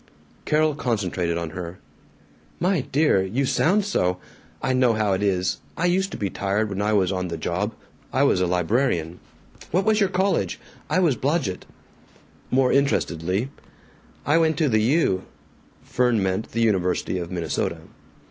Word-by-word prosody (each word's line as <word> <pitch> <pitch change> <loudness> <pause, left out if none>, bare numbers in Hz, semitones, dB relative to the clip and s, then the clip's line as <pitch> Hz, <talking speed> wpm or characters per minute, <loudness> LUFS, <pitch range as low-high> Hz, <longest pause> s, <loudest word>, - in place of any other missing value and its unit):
Carol 155 0 +2
concentrated 95 - -1
on 85 -2 -4
her. 90 +1 -6 0.8
"My 180 -3 +2
dear, 145 -8 +3
you 115 +9 -1
sound 195 +9 +2
so! 90 - 0 0.4
I 130 - 0
know 125 -2 +3
how 105 -2 +1
it 95 - -1
is. 95 -2 0 0.2
I 170 - 0
used 190 +2 +2
to - - -7
be 100 - -1
tired 100 +3 -1
when 95 0 -3
I 105 +1 +1
was 95 -3 +2
on 90 -1 -2
the 85 -1 -4
job 90 +7 -2 0.4
I - - +2
was 90 - +3
a 90 - +2
librarian. 90 - 0 0.5
What 185 +4 +1
was 220 -1 +3
your 200 -3 +3
college? 190 +1 0 0.3
I - - +1
was 170 -8 +3
Blodgett." 135 - -1 0.8
More 130 0 +3
interestedly, 95 - 0 0.7
"I 150 +4 +4
went 160 -2 +2
to 155 -3 +2
the 110 -2 +3
U." 115 - +2 0.6
Fern 120 -4 +1
meant 95 +3 -2
the 115 - -1
University 95 -4 +1
of 85 -1 -5
Minnesota. 85 -2 -2
110 Hz, 160 wpm, -24 LUFS, 90-145 Hz, 0.8 s, I